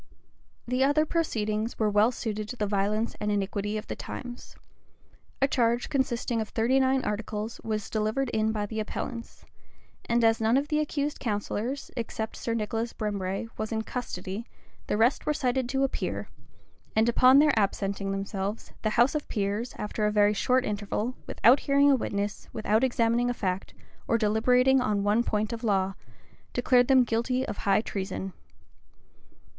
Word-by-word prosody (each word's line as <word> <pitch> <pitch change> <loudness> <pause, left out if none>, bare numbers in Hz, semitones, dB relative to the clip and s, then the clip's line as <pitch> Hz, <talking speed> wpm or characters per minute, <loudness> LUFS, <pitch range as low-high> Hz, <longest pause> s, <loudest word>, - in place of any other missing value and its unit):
The 250 +2 +1
other 290 +3 +3
proceedings 220 -9 -1
were 215 - +2
well 210 +3 +4
suited 215 -3 -4
to - - -5
the 215 - -1
violence 210 +3 0
and 210 - 0
iniquity 205 +1 -1
of 210 - -5
the - - -5
times. 245 -1 -8 0.9
A - - +6
charge 240 -2 +1
consisting 245 -4 0
of 220 - -5
thirty 240 +4 +2
nine 265 0 +2
articles, 210 +1 -4
was 215 -2 -2
delivered 220 +5 -1
in 220 -1 +1
by 210 -1 -2
the 220 +1 -4
appellants; 230 +2 -5 0.6
and 235 0 +3
as 225 0 +4
none 225 +3 +3
of 285 +2 -1
the 300 -1 +2
accused 295 -1 -2
counsellors, 225 +4 -3
except 225 -2 -4
Sir 230 - -2
Nicholas 225 +1 -2
Brembre, 200 -1 -2
was 215 +1 -3
in 220 -1 -1
custody, 220 -3 -5 0.4
the - - 0
rest 235 +5 +2
were 300 - +2
cited 255 -2 0
to 270 +1 +1
appear; 270 - -2 0.7
and 220 +1 +4
upon 255 +3 +6
their 295 0 +6
absenting 200 -1 0
themselves, 195 +1 -4
the 215 - +1
house 240 +3 +5
of 300 -1 -3
peers, 205 +3 -2
after 210 0 -1
a - - +1
very 210 0 +4
short 255 +5 +2
interval, 210 +3 -2
without 250 +5 +5
hearing 280 0 +4
a - - +6
witness, 205 -4 -3
without 220 +1 +1
examining 240 -1 +2
a 245 - -1
fact, 185 -3 -3 0.3
or 230 - +3
deliberating 250 +5 +3
on 210 -5 0
one 210 +3 +3
point 215 0 -1
of 230 +1 -6
law, 195 -3 +1 0.6
declared 245 0 +3
them 265 -2 +6
guilty 250 +3 0
of - - -4
high 200 +1 +2
treason. 190 -2 -4
225 Hz, 165 wpm, -28 LUFS, 210-250 Hz, 0.9 s, A